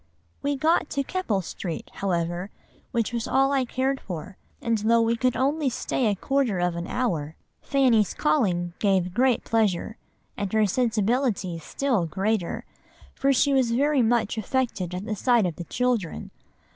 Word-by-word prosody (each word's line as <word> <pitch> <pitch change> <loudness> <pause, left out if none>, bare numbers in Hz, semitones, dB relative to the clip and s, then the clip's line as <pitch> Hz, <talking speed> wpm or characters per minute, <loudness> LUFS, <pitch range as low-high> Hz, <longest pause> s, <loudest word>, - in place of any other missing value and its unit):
"We 285 0 0
got 315 +3 +2
to 280 - -1
Keppel 265 - -1
Street, 170 0 -6
however, 175 0 -2 0.4
which 235 0 -1
was 235 -1 -2
all 270 +1 +3
I 270 -2 +2
cared 265 +2 -1
for, 185 +2 -7 0.2
and 230 -2 0
though 230 +2 +3
we 230 +1 +2
could 250 +1 0
only 285 +2 +1
stay 250 0 -1
a 205 - +2
quarter 265 -1 0
of 175 -1 0
an 170 0 -4
hour, 165 -12 -2 0.3
Fanny's 245 -7 +2
calling 180 - +1
gave 190 -3 +1
great 255 +2 +2
pleasure, 220 -1 0 0.4
and 200 -2 -3
her 220 -1 +4
sensibility 220 -4 0
still 235 -2 -1
greater; 190 +2 -1 0.5
for 275 - +1
she 280 +1 +3
was 255 -4 +2
very 285 +2 +3
much 230 -1 +1
affected 215 -6 -1
at 185 +3 -5
the 215 - -2
sight 235 0 +3
of 170 -4 -3
the 175 - -6
children. 240 -5 -1
225 Hz, 160 wpm, -25 LUFS, 185-260 Hz, 0.5 s, her